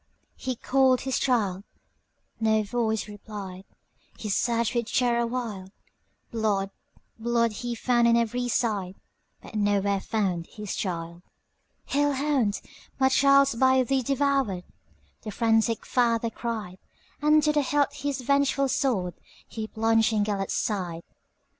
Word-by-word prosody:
He 255 -1 -3
called 260 +1 +3
his 265 0 -1
child,—no 220 0 -2
voice 220 0 -1
replied,—He 205 0 -10
searched 235 +3 +1
with 235 -2 -2
terror 235 -2 +2
wild; 225 -6 -4 0.6
Blood, 205 -4 0 0.5
blood, 235 0 +1
he 235 +3 -4
found 240 0 +2
on 235 0 +5
every 245 +2 0
side, 205 -6 -1 0.5
But - - -12
nowhere 205 -1 +1
found 185 -7 -1
his 210 -2 -6
child."Hell 180 +10 -4
hound! 265 -7 0 0.4
my 265 0 +4
child 275 +1 +5
's - - -2
by 260 +2 +4
thee 265 +2 +1
devoured,"The 265 -6 -3
frantic 225 0 +1
father 230 -2 +1
cried; 215 -6 -5 0.4
And 300 +1 +4
to 300 - +3
the 295 - +3
hilt 285 +1 +1
his 285 -1 -3
vengeful 275 +1 +2
swordHe 220 -2 -3
plunged 225 +1 +2
in 210 -1 +2
Gêlert's 200 -2 -2
side. 175 -6 -2
230 Hz, 120 wpm, -26 LUFS, 205-260 Hz, 0.6 s, on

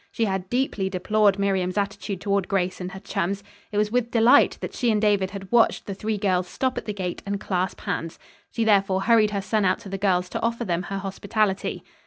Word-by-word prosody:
She 230 - 0
had 190 -2 -2
deeply 240 -6 0
deplored 200 +2 +2
Miriam's 190 -1 0
attitude 200 -2 -2
toward 200 -2 0
Grace 185 -2 -1
and 180 +1 -5
her 190 - -7
chums. 195 +2 -2 0.3
It 205 - -3
was 210 0 +1
with 240 -1 +1
delight 235 0 +5
that - - -6
she 245 - 0
and 215 -2 +2
David 205 -3 +2
had 195 -1 -9
watched 235 -1 +3
the 200 - -4
three 215 +2 -2
girls 185 -3 +1
stop 260 +7 -1
at - - -12
the 210 - -2
gate 185 -3 -4
and 200 0 -3
clasp 185 -2 -2
hands. 165 0 -3 0.3
She 230 - -1
therefore 195 -3 +3
hurried 220 0 +4
her 200 -2 -3
son 215 +1 +1
out 185 -1 +3
to 195 - -9
the 195 0 -4
girls 180 -2 +2
to - - -4
offer 235 +1 -1
them 175 -3 0
her 195 +2 -5
hospitality. 195 +1 -1
200 Hz, 225 wpm, -24 LUFS, 190-215 Hz, 0.3 s, delight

